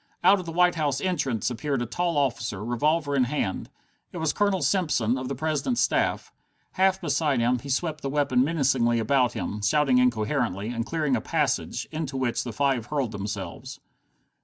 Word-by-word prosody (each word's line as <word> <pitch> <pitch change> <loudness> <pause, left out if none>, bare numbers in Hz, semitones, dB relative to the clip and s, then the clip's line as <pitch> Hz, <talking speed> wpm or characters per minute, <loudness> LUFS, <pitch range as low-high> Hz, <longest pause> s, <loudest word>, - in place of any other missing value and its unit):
Out 200 +1 +6
of 180 - -8
the - - -4
White 180 +1 +3
House 145 -5 -1
entrance 140 - -1
appeared 135 +3 -2
a 120 - -1
tall 170 +7 -1
officer, 115 -7 -1
revolver 145 +5 0
in 130 -2 +3
hand. 120 -8 -2 0.4
It - - -8
was 160 -2 0
Colonel 200 -3 +1
Simpson, 150 - +1
of 130 -1 -4
the 140 - -3
President's 155 - -1
staff. - - 0 0.4
Half 190 0 +2
beside 150 -4 +1
himself, 120 +1 +1
he 140 - -9
swept 155 +3 -1
the 135 - -3
weapon 140 -3 +2
menacingly 135 -6 +2
about 125 +1 +2
him, 105 0 -4
shouting 130 +4 +3
incoherently, 115 -3 0
and 115 -1 -3
clearing 155 -5 0
a 115 - -1
passage, 145 -3 -1
into 155 -4 -4
which 125 -3 -1
the 120 - -5
five 130 -1 0
hurled 140 -5 -1
themselves. 100 -1 -6
135 Hz, 180 wpm, -26 LUFS, 120-155 Hz, 0.4 s, Out